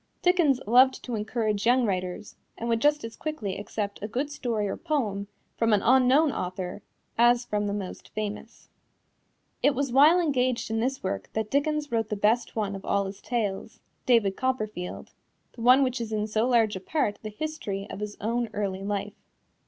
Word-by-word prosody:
Dickens 345 -8 +4
loved 255 +4 +5
to 245 - -5
encourage 215 -1 -1
young 250 0 +4
writers, 185 -1 -3 0.2
and 235 - -4
would 230 -1 +1
just 295 0 +3
as 225 0 -7
quickly 225 -12 -4
accept 205 0 -4
a 210 - -3
good 265 +7 -2
story 230 -7 -2
or 195 - -2
poem 210 -10 -2 0.3
from 230 -1 +3
an 205 - +2
unknown 265 +4 +5
author 180 0 -4 0.4
as 240 +1 +5
from 210 -2 -1
the - - -1
most 200 -3 -6
famous. 215 +1 -5 0.9
It 285 - +3
was 275 -1 -1
while 295 +7 +6
engaged 255 -7 0
in 225 - 0
this 265 +4 -1
work 95 -1 -3
that 220 -1 -2
Dickens 295 +1 0
wrote 225 -2 0
the 210 - -1
best 220 +3 +1
one 205 -3 -1
of 195 - -8
all 200 0 +1
his 195 +1 -7
tales 220 -3 -3 0.3
David 225 -6 +4
Copperfield, 215 -8 -3 0.4
the 235 - -11
one 255 +4 +6
which 255 -2 -1
is 225 -1 -5
in 210 -1 0
so 220 +2 0
large 230 -4 +3
a - - -4
part 210 -2 -1
the 215 - -5
history 210 -6 -4
of - - -6
his 210 0 -5
own 235 +2 -1
early 195 -2 -2
life. 205 0 -3
225 Hz, 185 wpm, -27 LUFS, 205-255 Hz, 0.9 s, while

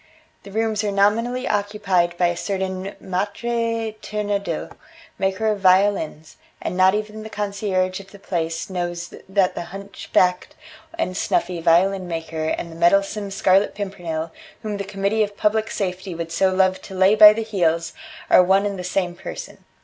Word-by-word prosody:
"The 200 - -12
rooms 220 0 0
are 210 - 0
nominally 230 +6 +1
occupied 200 -4 0
by 175 -1 +3
a 175 - -2
certain 190 +1 -3
Maitre 230 +4 -2
Turandot, 205 -5 -3 0.5
maker 190 +3 0
of 210 - -2
violins, 185 -5 +2 0.2
and - - -4
not 185 +1 +5
even 215 0 -4
the 220 - -8
concierge 200 -3 -1
of 195 0 -13
the 200 - -13
place 165 -4 -3
knows 175 -2 -4 0.2
that 190 -1 +2
the - - -5
hunchbacked 185 -1 -1 0.4
and 185 - -2
snuffy 175 -1 -1
violin 180 +3 +3
maker 165 -2 -4
and 170 +1 -3
the - - -10
meddlesome 195 +4 +2
Scarlet 195 +1 +2
Pimpernel, 170 -5 -4 0.3
whom 210 -2 -3
the 200 - -3
Committee 200 +2 -1
of 205 -1 -1
Public 215 +1 +1
Safety 185 -2 -3
would 165 0 -5
so 190 +3 +2
love 185 0 +2
to 190 - -10
lay 190 +2 +5
by 210 -1 +10
the 225 +1 -2
heels, 170 -6 0 0.3
are - - +7
one 190 +2 +3
and 200 -2 -3
the - - -4
same 180 0 -1
person. - - -9
195 Hz, 165 wpm, -22 LUFS, 180-205 Hz, 0.5 s, by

